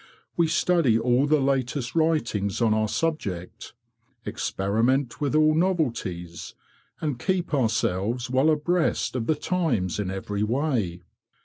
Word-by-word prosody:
We 170 Hz, -1 st, +3 dB
study 160 Hz, -6 st, +2 dB
all 125 Hz, +4 st, +2 dB
the 155 Hz, 0 st, +3 dB
latest 135 Hz, -2 st, -1 dB
writings 145 Hz, -, 0 dB
on 115 Hz, -3 st, +3 dB
our 110 Hz, 0 st, +1 dB
subject, 110 Hz, -, -3 dB, 0.5 s
experiment 115 Hz, +5 st, 0 dB
with 145 Hz, 0 st, 0 dB
all 155 Hz, 0 st, +5 dB
novelties, 115 Hz, -, -2 dB, 0.5 s
and 145 Hz, -6 st, -2 dB
keep 180 Hz, +1 st, -1 dB
ourselves 115 Hz, -2 st, 0 dB
well 130 Hz, +4 st, +2 dB
abreast 160 Hz, -1 st, +1 dB
of 115 Hz, -3 st, -2 dB
the 155 Hz, -, +2 dB
times 145 Hz, -, -1 dB
in 100 Hz, -3 st, -2 dB
every 100 Hz, +2 st, -4 dB
way. 110 Hz, -, -1 dB
125 Hz, 125 wpm, -25 LUFS, 105-155 Hz, 0.5 s, all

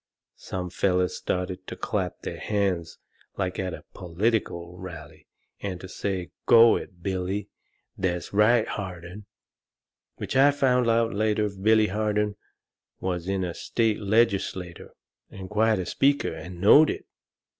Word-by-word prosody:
Some 90 Hz, -2 st, -5 dB
fellers 90 Hz, -1 st, +1 dB
started 90 Hz, 0 st, -3 dB
to -, -, -6 dB
clap -, -, -3 dB
their -, -, -5 dB
hands 95 Hz, -5 st, -1 dB, 0.4 s
like 95 Hz, -2 st, -2 dB
at 95 Hz, -2 st, -2 dB
a -, -, -14 dB
political 90 Hz, -1 st, -2 dB
rally 85 Hz, -5 st, -10 dB, 0.3 s
and 95 Hz, -3 st, -4 dB
to 95 Hz, -, -9 dB
say, 95 Hz, -3 st, -4 dB, 0.2 s
"Go 115 Hz, 0 st, +8 dB
it, 90 Hz, -2 st, -7 dB
Billy!" 95 Hz, +1 st, -2 dB, 0.5 s
"That's 90 Hz, -2 st, -2 dB
right, 110 Hz, +2 st, +4 dB
Harden!" 95 Hz, +1 st, -7 dB, 0.9 s
Which -, -, -5 dB
I 135 Hz, +2 st, +7 dB
found 125 Hz, -4 st, +2 dB
out 115 Hz, 0 st, +2 dB
later 105 Hz, +1 st, +1 dB
Billy 110 Hz, +3 st, +3 dB
Harden 105 Hz, 0 st, 0 dB, 0.6 s
was 90 Hz, -2 st, -3 dB
in 95 Hz, -1 st, 0 dB
the 90 Hz, -2 st, -2 dB
state 110 Hz, +2 st, 0 dB
legislature, 100 Hz, -5 st, 0 dB, 0.4 s
and 95 Hz, 0 st, -9 dB
quite 110 Hz, +1 st, +3 dB
a 90 Hz, -, -3 dB
speaker, 140 Hz, +5 st, +1 dB
and 85 Hz, +3 st, -9 dB
knowed 145 Hz, -, +7 dB
it. -, -, -4 dB
95 Hz, 135 wpm, -26 LUFS, 90-110 Hz, 0.9 s, Go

